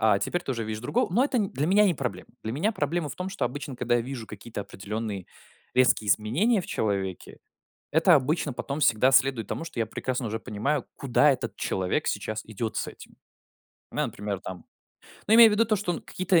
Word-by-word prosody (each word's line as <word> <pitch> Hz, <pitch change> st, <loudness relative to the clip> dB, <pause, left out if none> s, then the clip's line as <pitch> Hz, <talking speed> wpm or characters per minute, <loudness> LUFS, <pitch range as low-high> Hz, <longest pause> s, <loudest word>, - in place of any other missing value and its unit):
а 110 Hz, -3 st, +4 dB
теперь 175 Hz, -, -2 dB
тоже 125 Hz, -7 st, -3 dB
видишь 110 Hz, 0 st, -4 dB
другого. 225 Hz, -, 0 dB
Но 240 Hz, +7 st, +4 dB
это, 275 Hz, -3 st, 0 dB
э, -, -, +3 dB
для 140 Hz, +4 st, -1 dB
меня 200 Hz, +4 st, +5 dB
не 190 Hz, -4 st, +3 dB
проблема. 130 Hz, -4 st, -4 dB, 0.2 s
Для 110 Hz, -, -2 dB
меня 160 Hz, -, +1 dB
проблема 155 Hz, -2 st, -1 dB
в 130 Hz, -, -8 dB
том, 180 Hz, +1 st, -3 dB
что 190 Hz, -, -2 dB
обычно, 140 Hz, +2 st, -4 dB
когда 120 Hz, 0 st, +1 dB
я -, -, +1 dB
вижу 120 Hz, -1 st, -6 dB
какие-то 105 Hz, +1 st, -7 dB
определенные 100 Hz, 0 st, -5 dB, 0.5 s
резкие 125 Hz, -4 st, +3 dB
изменения 155 Hz, -, +2 dB
в -, -, -8 dB
человеке, 95 Hz, -3 st, -2 dB, 0.5 s
это 165 Hz, +2 st, +6 dB
обычно 145 Hz, +1 st, +1 dB
потом 140 Hz, +4 st, -4 dB
всегда 130 Hz, -1 st, +4 dB
следует 130 Hz, -5 st, +3 dB
тому, -, -, -4 dB
что 150 Hz, -, -6 dB
я 115 Hz, -, +2 dB
прекрасно 125 Hz, +3 st, -3 dB
уже 110 Hz, +1 st, -3 dB
понимаю, 125 Hz, +7 st, -2 dB
куда 140 Hz, +2 st, +3 dB
этот 120 Hz, -4 st, -3 dB
человек 95 Hz, -1 st, -1 dB
сейчас 110 Hz, 0 st, -2 dB
идет 110 Hz, +1 st, -4 dB
с -, -, -1 dB
этим. -, -, -12 dB, 0.8 s
У -, -, -11 dB
меня, -, -, +1 dB
например, 100 Hz, -1 st, -4 dB
там, 90 Hz, -3 st, -8 dB, 0.6 s
ну, 215 Hz, -, +5 dB
имея 230 Hz, 0 st, +10 dB
в -, -, 0 dB
виду 215 Hz, +2 st, +4 dB
то, 215 Hz, -1 st, +1 dB
что 185 Hz, -3 st, -2 dB
какие-то 185 Hz, -2 st, +1 dB
130 Hz, 210 wpm, -27 LUFS, 110-170 Hz, 0.8 s, имея